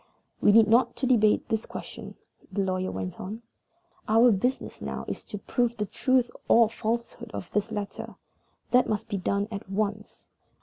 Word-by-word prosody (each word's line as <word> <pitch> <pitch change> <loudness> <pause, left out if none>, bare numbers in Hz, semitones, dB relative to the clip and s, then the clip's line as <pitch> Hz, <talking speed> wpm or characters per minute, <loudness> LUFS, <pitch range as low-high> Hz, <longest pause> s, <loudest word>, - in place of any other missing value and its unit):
"We - - +6
need 220 0 +7
not 235 +4 +4
debate 235 -5 +3
the 220 - +1
question," - - -9 0.4
the 200 - 0
lawyer 185 0 -1
went 95 -1 -5
on. 215 +5 -6 0.6
"Our 230 +3 +6
business 245 +6 -1
now - - -4
is - - -5
to 210 - -6
prove 235 +3 -1
the 210 - -1
truth 255 +4 +1 0.2
or 230 -1 +5
falsehood 235 +1 -3
of 180 - -6
this 210 +2 -1
letter. 205 -2 -5 0.6
That 250 0 +4
must 215 +1 -1
be 205 -3 -2
done 200 +2 0
at 200 -2 -6
once. 210 +1 -3
215 Hz, 165 wpm, -27 LUFS, 200-235 Hz, 0.6 s, need